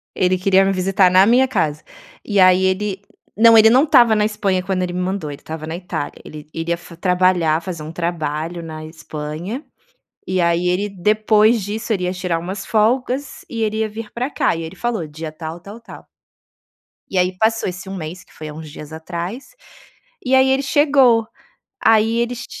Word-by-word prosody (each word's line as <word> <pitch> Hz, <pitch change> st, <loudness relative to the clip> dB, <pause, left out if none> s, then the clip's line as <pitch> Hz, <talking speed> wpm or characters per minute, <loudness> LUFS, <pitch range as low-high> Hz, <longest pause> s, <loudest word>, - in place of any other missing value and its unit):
Ele 185 Hz, 0 st, +2 dB
queria 190 Hz, +1 st, +3 dB
me 195 Hz, -, +2 dB
visitar 190 Hz, 0 st, +3 dB
na 185 Hz, +1 st, +6 dB
minha 250 Hz, +4 st, +4 dB
casa. 155 Hz, -, -1 dB, 0.4 s
E 205 Hz, -2 st, 0 dB
aí 185 Hz, 0 st, +5 dB
ele 195 Hz, +1 st, -1 dB, 0.3 s
não, 230 Hz, +1 st, +7 dB
ele 220 Hz, 0 st, +8 dB
não 255 Hz, +5 st, +5 dB
estava 240 Hz, -8 st, +5 dB
na 210 Hz, -, +2 dB
Espanha 200 Hz, -3 st, 0 dB
quando 185 Hz, -1 st, -1 dB
ele 175 Hz, -1 st, -3 dB
me 180 Hz, -, -3 dB
mandou; 185 Hz, -5 st, -3 dB
ele 140 Hz, -, -10 dB
estava 155 Hz, 0 st, -7 dB
na 160 Hz, -, -4 dB
Itália. 170 Hz, -4 st, -5 dB
Ele 150 Hz, 0 st, -10 dB
iria 170 Hz, +1 st, -2 dB
fa 170 Hz, 0 st, -13 dB
trabalhar, 180 Hz, -2 st, +2 dB
fazer 165 Hz, -3 st, -6 dB
um 155 Hz, -, -7 dB
trabalho 170 Hz, 0 st, -3 dB
na 155 Hz, -1 st, -8 dB
Espanha, 160 Hz, -, -6 dB, 0.6 s
e 185 Hz, -1 st, 0 dB
aí 170 Hz, +1 st, +1 dB
ele, 195 Hz, +4 st, 0 dB
depois 215 Hz, +3 st, +2 dB
disso, 220 Hz, +3 st, -3 dB
ele 180 Hz, -3 st, -1 dB
ia 180 Hz, -, -1 dB
tirar 180 Hz, -2 st, -2 dB
umas 190 Hz, +3 st, -6 dB
folgas 250 Hz, +5 st, 0 dB
e 230 Hz, -2 st, -4 dB
ele 215 Hz, 0 st, -1 dB
ia 220 Hz, -1 st, 0 dB
vir 215 Hz, 0 st, -8 dB
pra 250 Hz, +3 st, -3 dB
cá. -, -, +1 dB
E 165 Hz, -, -5 dB
ele 165 Hz, +3 st, -8 dB
falou: 225 Hz, -5 st, -2 dB
"Dia 155 Hz, +1 st, -7 dB
tal, 160 Hz, +1 st, -7 dB
tal, 200 Hz, +5 st, -11 dB
tal". 230 Hz, -, -13 dB, 1.0 s
E 190 Hz, -, -2 dB
aí, 180 Hz, 0 st, +1 dB
passou 225 Hz, 0 st, +1 dB
esse 180 Hz, +2 st, -8 dB
1 195 Hz, -, -5 dB
mês, 175 Hz, +2 st, -7 dB
que -, -, -24 dB
foi 155 Hz, -, -8 dB
há 150 Hz, -, -7 dB
uns 155 Hz, 0 st, -9 dB
dias 150 Hz, +1 st, -10 dB
atrás, 175 Hz, +9 st, -6 dB, 0.7 s
e 260 Hz, +1 st, +3 dB
aí 265 Hz, 0 st, +5 dB
ele 270 Hz, +1 st, +2 dB
chegou. 270 Hz, -6 st, +3 dB, 0.6 s
Aí 225 Hz, +1 st, +4 dB
ele 235 Hz, +1 st, -1 dB
ch 235 Hz, -, -7 dB
185 Hz, 200 wpm, -19 LUFS, 170-220 Hz, 1.0 s, ele